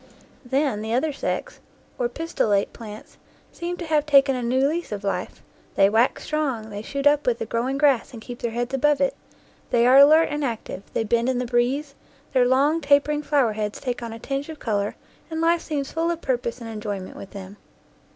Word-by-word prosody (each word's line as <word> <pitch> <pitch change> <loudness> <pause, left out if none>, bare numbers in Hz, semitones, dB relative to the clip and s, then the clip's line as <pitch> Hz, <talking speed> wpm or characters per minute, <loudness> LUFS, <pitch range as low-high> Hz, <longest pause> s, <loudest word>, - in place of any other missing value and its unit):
Then 265 -3 0
the 220 +2 -1
other 295 +4 0
sex, - - -4 0.4
or 240 -1 +1
pistillate 235 -9 0
plants, 215 -2 -11 0.3
seem 350 +1 -5
to 345 - -5
have 305 -2 +1
taken 275 -2 +5
a 250 - -3
new 260 +3 +2
lease 335 0 -3
of 205 -1 -4
life; 195 - -3 0.3
they 195 +1 +5
wax 230 +4 +2
strong, 265 -8 -2
they 205 0 -5
shoot 275 +5 -4
up 290 -1 +4
with 240 -2 +2
the 225 - -4
growing 240 +5 -1
grass 275 -4 +3
and 235 - -9
keep 240 +2 -9
their 235 - -2
heads 240 +3 -3
above 290 +1 +2
it; 275 -1 +1 0.5
they 235 0 +3
are 255 +2 +7
alert 310 +3 +7
and 295 0 -2
active, 230 -6 -4
they - - 0
bend 235 +3 +1
in 260 - 0
the 250 - -1
breeze, 255 +4 0 0.4
their 250 -2 +4
long, 285 +6 +3
tapering 290 +1 +3
flower 280 -7 +2
heads 210 -1 -3
take 250 -2 -3
on 235 -1 -5
a 225 - -7
tinge 275 +5 -4
of 315 - -7
color, 205 -5 -1 0.3
and 320 0 -4
life 335 +1 +2
seems 285 -3 -3
full 330 +1 0
of 340 -1 -2
purpose 245 -4 -2
and 230 - -7
enjoyment 205 -3 -5
with 195 - -9
them. 195 0 -10
255 Hz, 210 wpm, -24 LUFS, 225-295 Hz, 0.5 s, are